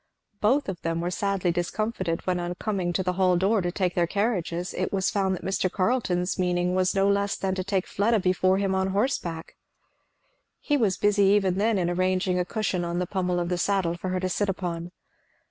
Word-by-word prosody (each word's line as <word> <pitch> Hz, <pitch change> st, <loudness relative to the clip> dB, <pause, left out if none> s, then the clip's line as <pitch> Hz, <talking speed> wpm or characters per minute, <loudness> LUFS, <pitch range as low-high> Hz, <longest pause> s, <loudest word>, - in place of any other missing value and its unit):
Both 260 Hz, +7 st, +2 dB
of 190 Hz, -3 st, -5 dB
them 165 Hz, 0 st, -1 dB
were 175 Hz, +1 st, -2 dB
sadly 195 Hz, -2 st, 0 dB
discomfited 175 Hz, 0 st, -2 dB
when 180 Hz, -1 st, 0 dB
on 175 Hz, 0 st, -3 dB
coming 185 Hz, -2 st, -2 dB
to 190 Hz, +2 st, -1 dB
the 180 Hz, 0 st, 0 dB
hall 185 Hz, -1 st, +3 dB
door 200 Hz, +4 st, +2 dB
to 175 Hz, 0 st, -1 dB
take 180 Hz, -1 st, -1 dB
their 175 Hz, -1 st, +1 dB
carriages 180 Hz, -4 st, -1 dB
it 185 Hz, -, -2 dB
was 190 Hz, -1 st, 0 dB
found 190 Hz, -2 st, +1 dB
that -, -, -9 dB
Mr. 190 Hz, -1 st, 0 dB
Carleton's 185 Hz, -4 st, 0 dB
meaning 180 Hz, 0 st, +1 dB
was 185 Hz, +1 st, +1 dB
no 195 Hz, 0 st, +3 dB
less 200 Hz, 0 st, +1 dB
than 190 Hz, -1 st, -2 dB
to 185 Hz, 0 st, -2 dB
take 195 Hz, -1 st, -1 dB
Fleda 220 Hz, +3 st, +1 dB
before 185 Hz, 0 st, +2 dB
him 195 Hz, -1 st, 0 dB
on 190 Hz, 0 st, +1 dB
horseback. 190 Hz, -6 st, -2 dB, 1.0 s
He 290 Hz, -, 0 dB
was 215 Hz, -9 st, +1 dB
busy 205 Hz, -1 st, +3 dB
even 195 Hz, -2 st, +3 dB
then 220 Hz, 0 st, +2 dB
in 175 Hz, -2 st, 0 dB
arranging 185 Hz, +1 st, +1 dB
a 180 Hz, -, 0 dB
cushion 190 Hz, -3 st, -1 dB
on 170 Hz, 0 st, -2 dB
the 180 Hz, -, 0 dB
pommel 180 Hz, -1 st, -1 dB
of 175 Hz, 0 st, -2 dB
the 180 Hz, -1 st, -1 dB
saddle 190 Hz, -3 st, +1 dB
for 185 Hz, +2 st, -5 dB
her 185 Hz, 0 st, -1 dB
to 185 Hz, -, -1 dB
sit 205 Hz, +2 st, 0 dB
upon. 175 Hz, -2 st, -3 dB
185 Hz, 215 wpm, -26 LUFS, 175-200 Hz, 1.0 s, hall